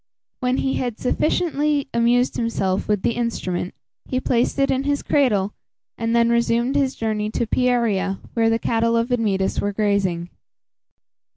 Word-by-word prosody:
When 250 0 0
he 265 - 0
had 245 -3 -3
sufficiently 295 +1 0
amused 240 +2 +2
himself 195 -5 -1
with 210 -3 0
the - - +2
instrument, 205 -7 -3 0.3
he 255 - 0
placed 245 0 0
it 275 0 +2
in 265 - +1
his 285 0 -1
cradle, 210 -9 +2 0.4
and 230 0 -1
then 235 0 +4
resumed 235 +2 +1
his 275 -2 +1
journey 215 -1 -2
to 235 - -1
Pieria, 220 -6 +1 0.2
where 225 -1 +2
the 225 - +2
cattle 230 0 +1
of 230 +2 0
Admetus 205 -6 0
were 205 0 -1
grazing. 195 -5 0
230 Hz, 155 wpm, -22 LUFS, 210-250 Hz, 0.4 s, then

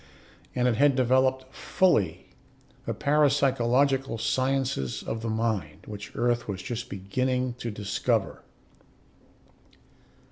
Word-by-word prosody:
And 125 0 +2
it 115 -3 +1
had 145 -1 +4
developed 130 +1 +2
fully 105 - +1 0.6
the - - 0
parapsychological 135 -3 +2
sciences 130 - -1
of 110 - -4
the 115 - -3
mind, 110 -9 -2
which 105 -1 -9
Earth 120 0 0
was 95 -3 -4
just 120 0 -5
beginning 125 +6 -1
to 120 - -3
discover. 105 -2 -1
125 Hz, 105 wpm, -27 LUFS, 110-130 Hz, 0.6 s, had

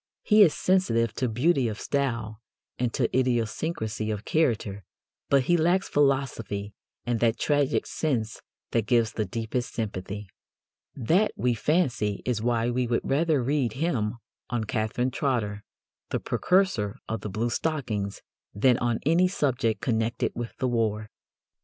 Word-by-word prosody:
He 215 0 +5
is 175 -7 +6
sensitive 115 - +2
to 125 - -1
beauty 130 +3 +2
of 110 -1 -4
style 115 -6 -2 0.4
and 125 -1 0
to - - 0
idiosyncrasy 115 -2 -1
of 105 0 -3
character, 110 -10 0 0.5
but 140 -2 +4
he 175 +7 +3
lacks 175 +4 +2
philosophy 130 -8 0 0.3
and 120 -1 0
that 115 -1 +2
tragic 145 -1 +1
sense 120 -8 -2 0.3
that 115 -3 0
gives 115 -2 +3
the 110 - -1
deepest 115 +5 -3
sympathy. 105 -2 -4 0.7
That, 170 - +2
we 125 0 +1
fancy, 120 - 0
is 120 -4 0
why 120 0 +1
we 125 0 0
would 115 0 +1
rather 150 -1 +2
read 135 -3 0
him 125 -8 -1 0.3
on 120 -2 -1
Catherine 110 +4 -1
Trotter, 110 -7 -1 0.5
the - - -1
precursor 180 - +1
of 115 -2 -3
the 105 - -5
bluestockings, 115 -1 -2 0.3
than 120 +4 +4
on 120 -2 0
any 170 +4 +4
subject 125 - 0
connected 115 -1 0
with 120 -1 -6
the 130 - 0
war. 110 -3 -1
120 Hz, 140 wpm, -27 LUFS, 110-140 Hz, 0.7 s, is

